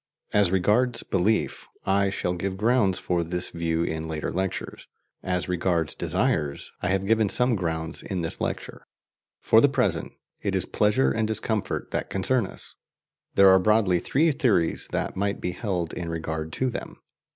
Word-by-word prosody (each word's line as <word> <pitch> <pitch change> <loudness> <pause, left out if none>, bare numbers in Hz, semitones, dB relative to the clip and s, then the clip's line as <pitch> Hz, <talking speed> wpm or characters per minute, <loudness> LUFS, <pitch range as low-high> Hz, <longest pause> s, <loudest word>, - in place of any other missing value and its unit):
As 105 -3 +4
regards 105 +7 +2
belief, 100 +4 0 0.2
I 100 0 +2
shall 90 -2 -1
give 95 +2 -3
grounds 105 -3 +2
for 85 -1 -1
this 90 +2 -4
view 85 -1 -1
in 80 -1 -3
later 80 -1 -3
lectures. 95 0 -4 0.3
As 90 -1 -2
regards 90 -3 0
desires, 70 -1 -1
I - - -1
have 95 0 0
given 110 0 +3
some 125 +2 +2
grounds 80 -4 -3
in 95 -2 -3
this 80 - +1
lecture. - - -4 0.6
For - - +6
the - - +5
present, - - 0 0.3
it - - -1
is - - 0
pleasure 105 -11 +2
and 110 +10 0
discomfort 110 -1 -1
that - - -2
concern 105 +3 +1
us. - - -11 0.6
There 100 -1 +7
are 95 - +6
broadly 100 -3 +3
three 155 - +2
theories 115 - +1
that - - -2
might 100 +1 -1
be 90 - -2
held 90 -3 -3
in 85 -2 -4
regard 80 -1 -4
to 130 -1 0
them. - - -7
95 Hz, 165 wpm, -25 LUFS, 85-105 Hz, 0.6 s, There